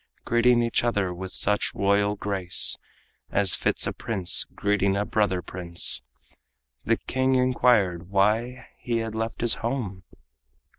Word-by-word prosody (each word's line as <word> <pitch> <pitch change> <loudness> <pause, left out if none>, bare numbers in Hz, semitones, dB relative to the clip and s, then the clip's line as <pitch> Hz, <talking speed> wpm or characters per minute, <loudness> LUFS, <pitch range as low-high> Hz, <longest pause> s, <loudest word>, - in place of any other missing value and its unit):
Greeting 120 0 +3
each 115 0 0
other 100 -6 -1
with 95 +2 -7
such 105 +2 0
royal 100 +1 +1
grace 95 -3 +2 0.5
As 95 -2 +2
fits - - 0
a - - -3
prince 95 -6 0
greeting 100 -1 0
a 105 - -1
brother 95 -5 -1
prince, 85 -7 +2 0.8
The - - +1
king 130 0 -1
inquired 115 -9 +1
why 110 +6 0
he 120 -1 -2
had 115 -1 -4
left 115 +1 -4
his 120 -1 +4
home? 115 -6 -4
105 Hz, 135 wpm, -25 LUFS, 95-120 Hz, 0.8 s, his